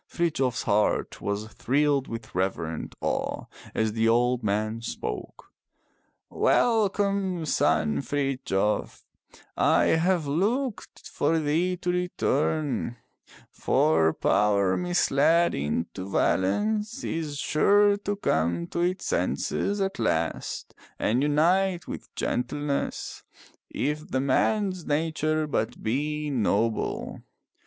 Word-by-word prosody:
Frithjof 150 -7 0
s - - -2
heart 105 +1 +1
was 100 +1 -2
thrilled 140 +1 +1
with 115 -1 -7
reverent 85 -4 -2
awe - - -2 0.3
as 110 -1 0
the 115 0 +2
old 120 +1 +2
man 110 +2 -1
spoke. - - -6 0.8
Welcome, 200 -5 +1
son 75 - +1
Frithjof, 130 - -1 0.5
I - - +3 0.2
have 175 -1 +1
looked 210 - -2
for 155 +3 0
thee 165 +4 0
to 180 0 -1
return. 155 -7 -1 0.5
For 80 +1 +2
power 100 -2 +2
misled 170 -1 +2
into 80 +6 -3
violence 210 - 0
is 155 -3 -3
sure 205 +8 +4
to 205 0 -3
come 85 - 0
to - - -3
its 180 +2 0
senses 205 +1 -1
at 195 -5 -2
last 85 -7 -2 0.2
and 120 +4 +1
unite 175 +5 +2
with - - -7
gentleness, 140 +3 -2 0.5
if 150 +2 -2
the 130 - -1
man's 185 +7 +1
nature 155 0 0
but 125 -7 -2
be 150 +6 -1
noble. 115 -2 -1
145 Hz, 105 wpm, -26 LUFS, 110-180 Hz, 0.8 s, sure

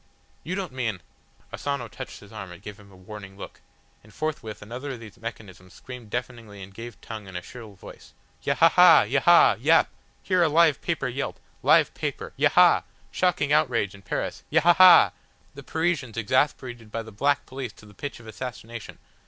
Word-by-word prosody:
You 180 - -4
don't 190 -5 -4
mean 115 -7 -3 0.3
" - - -33
Asano 140 -4 -3
touched 105 - -9
his 105 -1 -15
arm 100 -4 -8
and 90 - -11
gave 105 +1 -10
him 100 -1 -17
a - - -16
warning 95 +1 -11
look, - - -10 0.4
and 110 - -18
forthwith 110 -6 -5
another 125 +6 -6
of 125 - -9
these 110 -3 -13
mechanisms 100 -5 -9
screamed 125 -4 -11
deafeningly 115 -4 -6
and 95 +1 -12
gave 115 +1 -10
tongue 110 -3 -8
in 95 - -11
a 90 - -5
shrill 110 -3 -11
voice. 95 - -14 0.3
"Yahaha, - - +6
Yahah, - - +5
Yap! - - +4 0.3
Hear 185 -2 +1
a 165 - +4
live 160 -2 +3
paper - - -2
yelp! - - -4 0.2
Live - - +4
paper. - - -5
Yaha! - - +5 0.3
Shocking 165 -5 +1
outrage 115 -9 +1
in 100 - -14
Paris. 100 - -4
Yahahah! 175 +1 +7 0.4
The - - -10
Parisians 160 -8 -2
exasperated 120 -1 -1
by 115 +1 -4
the 110 - -12
black 145 +7 0
police 130 -4 -7
to - - -17
the 105 - -16
pitch 140 +6 -7
of 115 - -15
assassination. 115 0 -8
115 Hz, 175 wpm, -25 LUFS, 105-140 Hz, 0.4 s, Yahahah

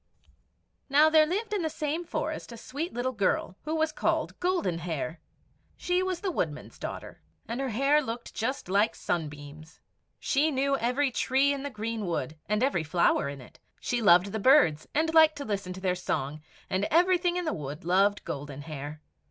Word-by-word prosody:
Now 300 +3 +5
there 310 -1 +6
lived 420 +5 -2
in 410 - 0
the 320 - -1
same 305 +3 -2
forest 310 -5 -4
a 235 - -8
sweet 290 +9 -5
little 245 +2 -2
girl, 200 -4 0
who 310 +1 -1
was 315 0 +1
called - - -1
Golden 350 - 0
Hair. 160 -1 -4 0.6
She 360 +1 0
was 370 -2 -2
the 385 - -1
Woodman's 155 - -4
daughter, - - -7 0.3
and 235 +4 -3
her 270 - -1
hair 275 +6 +3
looked 235 -3 -6
just 255 +2 -3
like 205 +4 +2
sunbeams. 155 0 -5 0.4
She 295 +3 +2
knew 275 -1 +1
every 260 +3 +1
tree 270 +3 +2
in 280 - -4
the 285 - -4
greenwood, 210 - -3
and 210 +3 +1
every 190 - +1
flower 160 -3 +2
in 140 -1 -7
it. 125 - -16 0.2
She 240 -1 -1
loved 180 -1 +5
the 220 - -2
birds, 200 - +4
and 320 +2 +1
liked 315 -1 +6
to 285 - -6
listen 200 -4 -3
to 185 - -8
their 185 -1 +1
song; 155 -4 -3 0.3
and 190 +2 0
everything 355 - +3
in 360 - -2
the 315 - 0
wood 150 +1 -6
loved 195 +3 +2
Golden 145 0 -6
Hair. 150 0 -7
235 Hz, 185 wpm, -28 LUFS, -, 0.6 s, there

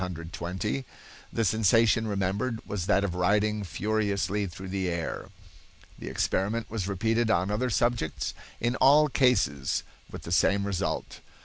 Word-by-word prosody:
The 85 -4 -4 0.6
sensation 110 +2 +3
remembered 105 +4 -1
was 95 -3 -3
that 100 -1 +3
of 95 -4 -1
riding 105 +4 +1
furiously 100 +1 -1
through 95 +2 -8
the 95 -1 -1
air. 85 -2 -4 0.7
The - - -8
experiment 105 +4 -1
was 105 -4 -2
repeated 110 +4 +1
on 95 -1 +2
other 125 +5 0
subjects, 115 -8 0 0.3
in 120 +2 0
all 150 +3 +6
cases 125 - +2 0.3
with - - -9
the 85 - -7
same 100 +3 +3
result. 100 -3 -3
100 Hz, 130 wpm, -28 LUFS, 90-110 Hz, 0.7 s, all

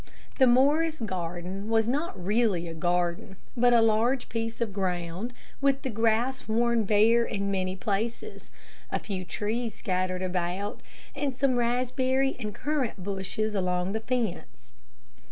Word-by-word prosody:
The 260 - +7
Morris 295 +6 +4
garden 185 0 -4
was 225 -1 +3 0.3
really 200 -1 +1
not 170 - -5
a - - -6
garden 175 +4 -1 0.2
but 245 0 +4
a 235 -1 +6
large 230 +4 +2
piece 230 0 -3
of 225 -4 -1
ground 180 +2 -2 0.3
with 275 -1 +2
the 260 - -2
grass 225 +4 +1
worn 230 0 +2
bare 220 +3 +5
in 200 -3 -2
many 185 -1 -1
places, 225 - -3 0.4
a - - +1
few 190 -3 -4
trees 220 +4 -3
scattered 185 0 -1
about, 185 +4 -2 0.3
and 280 -3 -1
some 265 0 +2
raspberry 255 +2 +1
and 215 -3 -3
currant 265 -9 -2
bushes 200 +2 -2
along 180 -1 0
the 220 - -1
fence. 230 - -3
220 Hz, 140 wpm, -28 LUFS, 185-245 Hz, 0.4 s, The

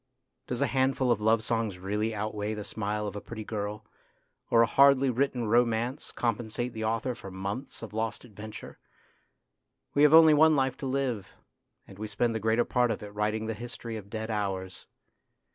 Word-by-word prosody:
Does - - -3
a - - +4
handful 130 -1 +1
of 110 -3 +1
love 110 +1 +3
songs 115 -5 -1
really 105 +4 -2
outweigh 105 0 -3
the 105 - -5
smile 105 0 -3
of 100 -1 -5
a 105 - -5
pretty 110 -2 -7
girl, 105 0 -4 0.6
or 115 0 +6
a - - +5
hardly 135 +2 +5
written 125 -1 0
romance 120 +3 +1
compensate 120 +1 -2
the 110 - -4
author 115 +3 -1
for 100 -4 -10
months 100 +8 -5
of 110 - -8
lost 110 +2 -3
adventure? 105 -1 -10 1.1
We 145 - +2
have 150 +1 +7
only 160 -1 +9
one 155 +1 +6
life 135 -2 +1
to 135 - -4
live, 130 -7 -2 0.5
and 95 - -14
we 110 - -4
spend 115 +3 0
the 110 - -2
greater 110 +2 +2
part 125 -1 +2
of 110 - -3
it 105 0 -9
writing 105 +1 -1
the 110 - -2
history 120 0 -7
of 100 -2 -8
dead 110 +1 -4
hours. 95 -3 -3
110 Hz, 185 wpm, -29 LUFS, 105-125 Hz, 1.1 s, only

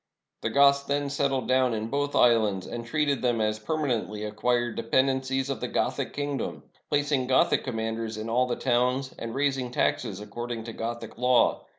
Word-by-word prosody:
The - - -1
Goths 140 0 +5
then 140 0 -1
settled 135 -2 0
down 130 -2 +3
in 110 +1 -3
both 145 +1 -1
islands, 110 -5 +3
and 120 0 -5
treated 145 +1 0
them 120 -2 +1
as 110 0 0
permanently 115 -6 -2
acquired 120 +3 0
de - - -2
pendencies 130 +2 +1
of 135 - -3
the - - -3
Gothic - - -1
kingdom, 145 -1 -3 0.3
placing 145 -3 +1
Gothic 130 - +3
com 130 -3 -4
manders 110 0 -3
in 110 +1 -5
all 125 +3 +2
the 120 - -1
towns, 125 +1 0
and 115 0 -5
raising 135 -2 0
taxes 110 -4 -1
according 115 +2 -5
to 115 0 -7
Gothic 115 0 -5
law. 125 0 +3
125 Hz, 180 wpm, -27 LUFS, 115-135 Hz, 0.3 s, Goths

